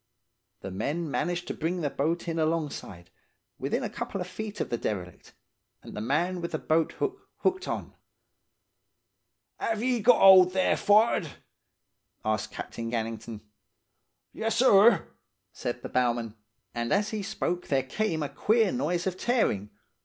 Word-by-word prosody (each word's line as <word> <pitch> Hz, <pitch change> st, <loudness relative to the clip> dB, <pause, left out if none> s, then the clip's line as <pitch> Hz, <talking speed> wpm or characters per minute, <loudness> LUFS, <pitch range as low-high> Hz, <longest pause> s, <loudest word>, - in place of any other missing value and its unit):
"The 95 Hz, -, -6 dB
men 145 Hz, -, -2 dB
managed 175 Hz, +4 st, -1 dB
to -, -, -1 dB
bring 170 Hz, +3 st, -2 dB
the 145 Hz, -, 0 dB
boat 165 Hz, +5 st, -1 dB
in 165 Hz, -1 st, -2 dB
alongside, 150 Hz, -, -3 dB, 0.5 s
within -, -, -1 dB
a -, -, -1 dB
couple 195 Hz, -, -4 dB
of 180 Hz, -, -3 dB
feet 215 Hz, +3 st, -7 dB
of -, -, -3 dB
the 120 Hz, -, 0 dB
derelict, 90 Hz, -5 st, -5 dB, 0.5 s
and -, -, -10 dB
the 105 Hz, -, -4 dB
man 170 Hz, +10 st, 0 dB
with 170 Hz, -, -5 dB
the -, -, +1 dB
boat 160 Hz, 0 st, +1 dB
hook 395 Hz, 0 st, -4 dB
hooked 375 Hz, 0 st, 0 dB
on. -, -, -4 dB, 1.7 s
""Ave 225 Hz, +1 st, -1 dB
ye 250 Hz, -2 st, +2 dB
got 235 Hz, +3 st, +5 dB
'old 185 Hz, -2 st, +8 dB
there, 190 Hz, 0 st, +2 dB
forrard?' 210 Hz, -4 st, +3 dB, 1.0 s
asked 110 Hz, -1 st, -1 dB
Captain 115 Hz, 0 st, -6 dB
Gannington. 115 Hz, -1 st, -4 dB, 0.9 s
"'Yessir!' 225 Hz, -3 st, +4 dB, 0.5 s
said 120 Hz, 0 st, -4 dB
the -, -, -5 dB
bowman; 120 Hz, -3 st, 0 dB, 0.4 s
and 120 Hz, 0 st, -3 dB
as 205 Hz, +2 st, +2 dB
he 215 Hz, -1 st, -3 dB
spoke 195 Hz, -3 st, -3 dB
there 135 Hz, -2 st, +1 dB
came 160 Hz, +3 st, -1 dB
a 145 Hz, -, -3 dB
queer 220 Hz, -2 st, +2 dB
noise 180 Hz, -9 st, -1 dB
of 185 Hz, -1 st, -2 dB
tearing. 185 Hz, -, 0 dB
170 Hz, 150 wpm, -28 LUFS, -, 1.7 s, old